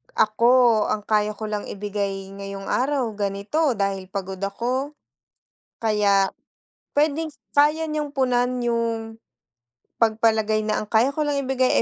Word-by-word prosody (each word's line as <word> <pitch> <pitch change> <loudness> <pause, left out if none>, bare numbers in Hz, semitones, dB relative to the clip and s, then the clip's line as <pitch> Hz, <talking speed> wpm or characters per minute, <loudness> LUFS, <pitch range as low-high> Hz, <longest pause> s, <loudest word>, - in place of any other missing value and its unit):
Ako, 230 +1 +4
ang 210 -1 -3
kaya 210 -1 +2
ko 215 +1 -6
lang 210 -1 -3
ibigay 200 -1 -3
ngayong 195 0 -7
araw 265 -1 +1
ganito 205 +10 0
dahil 195 -1 -2
pagod 190 -1 -5
ako. 250 +8 -2 0.9
Kaya 205 -3 +3 0.6
pwedeng 305 +1 +1 0.2
kaya 300 +2 +4
niyong 300 -2 -3
punan 250 -2 +1
yung 230 -2 -1 0.8
pagpalagay 220 -1 +2
na 215 0 0
ang 215 - -6
kaya 230 +6 +3
ko 300 +1 -1
lang 290 - 0
ibigay 260 -1 +2
225 Hz, 125 wpm, -23 LUFS, 205-260 Hz, 0.9 s, Ako